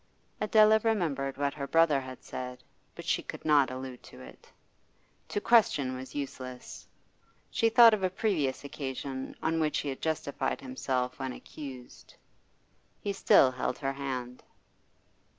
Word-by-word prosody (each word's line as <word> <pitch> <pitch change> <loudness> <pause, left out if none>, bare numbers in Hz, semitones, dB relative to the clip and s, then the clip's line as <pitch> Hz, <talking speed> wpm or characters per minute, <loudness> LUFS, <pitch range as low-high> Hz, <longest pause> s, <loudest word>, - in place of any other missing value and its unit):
Adela 215 +1 +5
remembered 155 -12 0
what 140 0 0
her 140 -2 -5
brother 165 -3 +4
had 130 -1 -10
said, 125 0 -7 0.3
but - - -9
she - - +1
could - - -9
not 145 -3 +4
allude 130 -1 -7
to - - -14
it. - - -14 0.8
To - - -2
question 150 - +3
was 130 +1 -9
useless. 130 -3 -7 0.6
She 225 - +2
thought 230 0 +8
of 210 - 0
a 185 - +2
previous 175 -10 -1
occasion 135 -1 -5
on 165 0 +1
which 155 -1 +1
he 145 - -2
had 135 - -6
justified 155 -3 -2
himself 130 - -3
when 130 -1 -3
accused. 130 -4 -10 0.8
He 200 - -3
still 135 -8 +5
held 125 0 -2
her 135 -1 -2
hand. 130 -3 -5
140 Hz, 145 wpm, -30 LUFS, 130-175 Hz, 0.8 s, thought